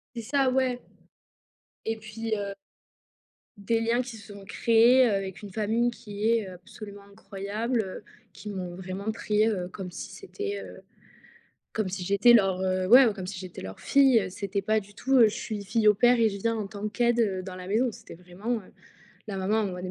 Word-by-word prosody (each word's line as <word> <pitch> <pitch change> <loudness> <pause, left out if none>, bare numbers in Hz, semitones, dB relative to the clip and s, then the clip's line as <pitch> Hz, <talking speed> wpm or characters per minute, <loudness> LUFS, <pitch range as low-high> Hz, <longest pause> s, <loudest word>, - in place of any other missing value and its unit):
C'est 235 - -4
ça, 265 +3 +1
ouais 255 -1 +1 1.1
et 225 0 -1
puis 220 +1 -4
heu 200 -1 -4 1.0
des 225 +3 0
liens 230 +2 +1
qui 245 -2 -8
se 205 -1 -12
sont 200 -1 -11
créés, 235 +5 +4
heu, - - +1
avec 195 -1 -3
une 205 - -8
famille 220 +4 +1
qui 210 -2 -3
est, 230 -2 +2
heu, 185 - -8
absolument 200 +3 -11
incroyable, 210 +4 -3
heu, 190 -3 -7 0.3
qui 210 - -9
m'ont 180 -3 -5
vraiment 190 +3 -4
pris, 215 -1 +1
heu, 185 -5 -2
comme 185 -1 -7
si 175 - -7
c'était, 410 0 -5
heu, - - -11 0.9
comme 215 -3 -1
si 185 0 -4
j'étais 200 +6 +5
leur, 195 -4 +3
heu, 185 0 0
ouais, 250 +6 +8
comme 190 -3 -6
si 190 +1 -6
j'étais 185 -1 -8
leur 95 0 -8
fille. 265 -8 +4
C'était 200 +1 -3
pas 215 +2 +2
du 205 -1 -9
tout, 265 +5 -1
heu: 235 -4 +7
«Je 210 - -5
suis 210 -3 -5
fille 215 +2 +2
au 210 - +6
pair 240 +3 +4
et 225 - +5
je 200 - -5
viens 230 +3 0
en 215 -2 -3
tant 205 +1 -6
qu'aide 230 -4 +1
dans 185 -1 -7
la 180 0 -8
maison». 225 +6 +1
C'était 225 +1 -12
vraiment, 180 +7 -4
heu, 195 - -15 0.6
la 200 - -4
maman 190 +3 0
envoie 185 -4 -3
des 185 - -4
210 Hz, 205 wpm, -27 LUFS, 195-230 Hz, 1.1 s, ouais